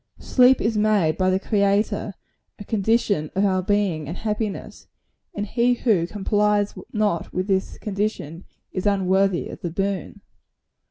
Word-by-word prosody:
Sleep 255 0 +4
is 220 +1 0
made 205 -7 +2
by 185 +1 +1
the 185 0 +2
Creator 200 0 0 0.4
a - - -8
condition 205 -6 0
of 195 +2 +2
our 185 -1 +2
being 185 -6 0
and 165 - -5
happiness; 215 -2 -4 0.5
and 205 - -2
he 245 +3 +2
who 205 -9 +1
complies 205 +1 +1 0.2
not 210 -6 -1
with 185 +1 -2
this 190 -1 -1
condition, 195 -5 -4 0.3
is 185 +2 -2
unworthy 190 -2 +2
of - - -9
the 175 - -3
boon. 195 +3 -3
200 Hz, 145 wpm, -23 LUFS, 185-210 Hz, 0.5 s, Sleep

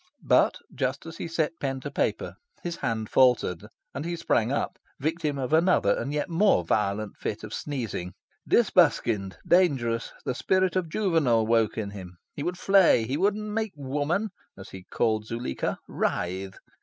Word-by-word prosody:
But, - - +4 0.2
just 135 +2 -2
as 165 0 -8
he - - -4
set 165 0 -1
pen 135 -1 -2
to 145 - -6
paper, - - -1 0.3
his 170 -1 -4
hand 115 -4 -2
faltered, 125 -10 +3 0.3
and 140 - -4
he 170 +1 -3
sprang 125 -8 +1
up, 140 - -2 0.2
victim 155 0 -1
of 130 +2 -3
another 175 +3 +4
and 140 - -3
yet 150 +3 -1
more 175 - +3
violent 105 +2 -1
fit 105 - -4
of 105 - -7
sneezing. 115 - -4 0.3
Disbuskined, 100 -5 +3
dangerous. 130 -11 +2
The - - 0
spirit 185 +7 +1
of 180 -3 0
Juvenal 155 - +2
woke 115 -1 +2
in 105 -2 -3
him. 90 -3 -10 0.2
He - - -6
would 175 +4 -2
flay. 190 - +5
He 130 - -2
would 195 +6 +2
make 215 0 -3
Woman 150 +9 -1 0.3
(as 95 +2 -10
he 95 -1 -10
called 110 -2 0
Zuleika) 115 - -3
writhe. 95 +2 -2
135 Hz, 165 wpm, -27 LUFS, 110-170 Hz, 0.3 s, flay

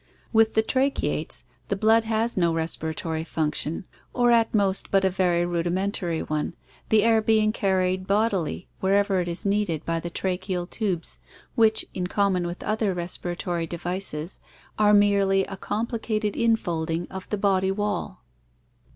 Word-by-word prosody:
With 225 0 +4
the 220 - +4
tracheates 270 +4 0 0.2
the 200 - 0
blood 220 +2 +3
has 225 +1 0
no 170 -3 +2
respira 160 -1 -2
tory 160 -1 -3
function 160 +1 -2 0.3
or 245 -1 +4
at 230 -1 +4
most 200 -3 +1
but 195 -1 +3
a 190 - +2
very 175 -2 +1
rudimentary 175 0 -1
one, 155 +2 -3 0.3
the 215 -1 +4
air 225 -1 +4
being 215 -1 +3
carried 185 -3 0
bodily 200 -5 0
wherever 195 0 +2
it 175 - -4
is 170 +3 -3
needed 200 -6 0
by 165 0 -1
the 170 - -5
tracheal 180 0 -2
tubes 190 -5 -3 0.3
which, 220 -3 +3
in 180 -1 -2
common 185 -2 +1
with 175 +1 -6
other 215 -3 0
respiratory 175 -1 -3
devices, 175 -1 -3 0.4
are 210 0 +5
merely 200 -1 +4
a 195 - -7
compli 225 +4 -3
cated 215 -2 -1
infolding 175 -8 0
of 190 0 -8
the 210 - -1
body 190 -1 +2
wall. 205 -1 -3
190 Hz, 150 wpm, -25 LUFS, 175-215 Hz, 0.4 s, are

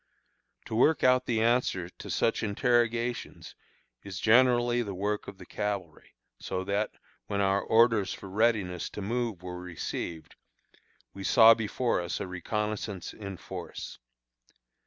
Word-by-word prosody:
To 115 - -7
work 145 +6 +3
out 130 0 +4
the 115 -2 +1
answer 115 -7 +1
to - - -11
such - - +1
interrogations 120 +1 0 0.5
is 95 -2 -7
generally 120 +1 +4
the 100 -4 -4
work 105 +2 -2
of 95 - -8
the - - -12
cavalry; 105 -2 -5 0.2
so 95 0 -3
that, 100 +2 0 0.4
when 100 - -2
our 100 0 +2
orders 110 -3 +3
for - - -7
readiness 100 -4 0
to - - -3
move 115 -4 -2
were 90 -1 -6
received, 85 -2 -5 0.8
we 100 - -8
saw 115 +3 +8
before 115 -1 -1
us 85 0 -3
a - - -3
reconnoissance 105 +1 -4
in 100 -3 -7
force. - - -8
105 Hz, 135 wpm, -29 LUFS, 95-120 Hz, 0.8 s, saw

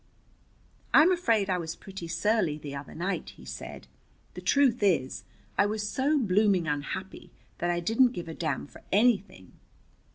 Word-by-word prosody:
"I'm 330 +4 +7
afraid 230 - +2
I 185 -2 0
was 165 -1 -5
pretty 190 -3 -9
surly 175 -2 +1
the 145 -2 -7
other 140 0 -8
night," 185 +4 -3
he - - -13
said. - - -8 0.5
"The - - -8
truth 265 -4 +3
is, 135 - +1 0.3
I - - +5
was 210 0 -2
so 280 +7 +1
blooming 200 - +2
unhappy 150 +6 -4 0.3
that 175 - 0
I 175 0 0
didn't 235 +7 +3
give 175 -7 -6
a 165 - -5
damn 160 -1 -2
for - - -15
anything." 200 - +1
195 Hz, 160 wpm, -28 LUFS, 165-225 Hz, 0.5 s, I'm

